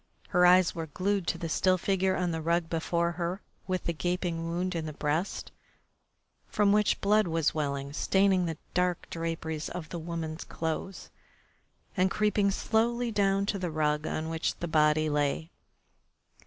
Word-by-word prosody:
Her 180 Hz, 0 st, +5 dB
eyes 180 Hz, 0 st, +5 dB
were 165 Hz, -1 st, -5 dB
glued 190 Hz, +4 st, -1 dB
to -, -, 0 dB
the 165 Hz, -, -4 dB
still 185 Hz, +3 st, +2 dB
figure 190 Hz, 0 st, +1 dB
on 180 Hz, -1 st, 0 dB
the 160 Hz, 0 st, -3 dB
rug 170 Hz, +1 st, 0 dB
before 170 Hz, +1 st, 0 dB
her 175 Hz, +2 st, -3 dB, 0.3 s
with 185 Hz, -1 st, -1 dB
the 170 Hz, -, -1 dB
gaping 175 Hz, 0 st, -2 dB
wound 180 Hz, +2 st, -1 dB
in 165 Hz, -2 st, -3 dB
the 155 Hz, -, -5 dB
breast, 155 Hz, +6 st, -2 dB, 1.0 s
from 205 Hz, -1 st, +2 dB
which 210 Hz, 0 st, +3 dB
the -, -, -26 dB
blood 210 Hz, 0 st, +3 dB
was 165 Hz, -2 st, +1 dB
welling, 140 Hz, -2 st, -2 dB
staining 190 Hz, +1 st, +2 dB
the 165 Hz, -1 st, -4 dB, 0.2 s
dark 180 Hz, -1 st, 0 dB
draperies 165 Hz, -2 st, -3 dB
of 175 Hz, -3 st, -6 dB
the 170 Hz, -, -5 dB
woman's 165 Hz, -1 st, -4 dB
clothes, 165 Hz, +4 st, -4 dB, 0.8 s
and 190 Hz, -1 st, +3 dB
creeping 210 Hz, -1 st, +2 dB
slowly 235 Hz, +4 st, 0 dB
down 195 Hz, -1 st, +2 dB
to 200 Hz, -1 st, -1 dB
the 180 Hz, -1 st, -2 dB
rug 150 Hz, -1 st, 0 dB
on 155 Hz, 0 st, -2 dB
which 165 Hz, 0 st, -1 dB
the 175 Hz, -, -5 dB
body 155 Hz, -1 st, +3 dB
lay. 150 Hz, +2 st, 0 dB
170 Hz, 170 wpm, -29 LUFS, 160-190 Hz, 1.0 s, Her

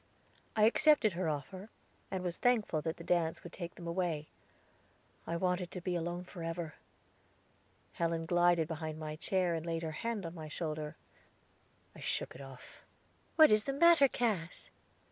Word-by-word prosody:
I 215 Hz, -, +3 dB
accepted 230 Hz, -, +5 dB
her 170 Hz, -1 st, -1 dB
offer, 185 Hz, +8 st, -5 dB, 0.4 s
and 190 Hz, -1 st, -3 dB
was 175 Hz, -1 st, -3 dB
thankful 220 Hz, -10 st, +2 dB
that 160 Hz, +2 st, -3 dB
the 170 Hz, -, -9 dB
dance 170 Hz, -2 st, 0 dB
would 175 Hz, -, -10 dB
take 175 Hz, -2 st, -6 dB
them 170 Hz, -, -10 dB
away. 170 Hz, -3 st, -2 dB, 1.0 s
I 170 Hz, -, -1 dB
wanted 180 Hz, 0 st, 0 dB
to 180 Hz, -, -6 dB
be 180 Hz, +1 st, -2 dB
alone 175 Hz, +1 st, -2 dB
forever. 165 Hz, -3 st, -5 dB, 1.2 s
Helen 165 Hz, -1 st, -1 dB
glided 175 Hz, -1 st, +3 dB
behind 160 Hz, -1 st, -4 dB
my 155 Hz, -1 st, -5 dB
chair, 180 Hz, +2 st, 0 dB
and 165 Hz, -1 st, -2 dB
laid 165 Hz, -1 st, -2 dB
her 160 Hz, -, -2 dB
hand 215 Hz, +3 st, -3 dB
on 165 Hz, -, -5 dB
my 160 Hz, -3 st, -7 dB
shoulder; 155 Hz, 0 st, -4 dB, 1.0 s
I -, -, -11 dB
shook -, -, -2 dB
it -, -, -11 dB
off. 135 Hz, -2 st, -12 dB, 0.5 s
"What 315 Hz, -5 st, +8 dB
is 215 Hz, 0 st, +4 dB
the 275 Hz, -, -1 dB
matter, 330 Hz, -1 st, +6 dB
Cass?" 210 Hz, -10 st, -2 dB
175 Hz, 165 wpm, -33 LUFS, 160-190 Hz, 1.2 s, What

